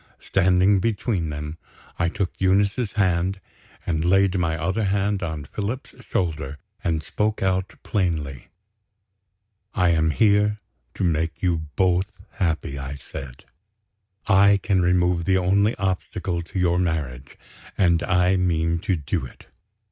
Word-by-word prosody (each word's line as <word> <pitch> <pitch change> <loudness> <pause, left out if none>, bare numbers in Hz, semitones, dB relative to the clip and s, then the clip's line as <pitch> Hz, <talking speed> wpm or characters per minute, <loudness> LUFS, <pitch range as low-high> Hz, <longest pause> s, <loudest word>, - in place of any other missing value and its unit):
Standing 95 +1 +3
between 100 -4 -1
them, 75 +2 -6 0.4
I 85 0 +2
took 95 0 -2
Eunice's 100 +4 +2
hand, 95 -1 +1 0.5
and 80 -2 0
laid 95 +2 +3
my 80 -3 0
other 95 +7 -1
hand 100 +1 0
on 80 -4 -4
Philip's 105 - -5
shoulder, 75 -5 -2 0.3
and 80 -5 0
spoke 105 +3 -1
out 95 0 0
plainly. 80 - -2 1.3
"I 90 -2 +3
am 80 -1 +3
here 105 +3 +3 0.4
to - - -3
make 80 -1 -1
you 85 -4 0
both 95 +2 +2 0.2
happy," 80 -7 -2
I 70 +1 -5
said. 65 -2 -9 0.8
"I 100 +1 +5
can 95 -3 +2
remove 90 -1 +2
the 95 -1 +3
only 100 +4 +2
obstacle 95 -2 -2
to 85 +3 -8
your 90 -1 +2
marriage, 70 -7 -3 0.4
and 85 -3 +3
I 90 +1 +2
mean 85 -2 +1
to 95 +2 0
do 75 -5 -2
it. - - -17
90 Hz, 135 wpm, -23 LUFS, 80-95 Hz, 1.3 s, I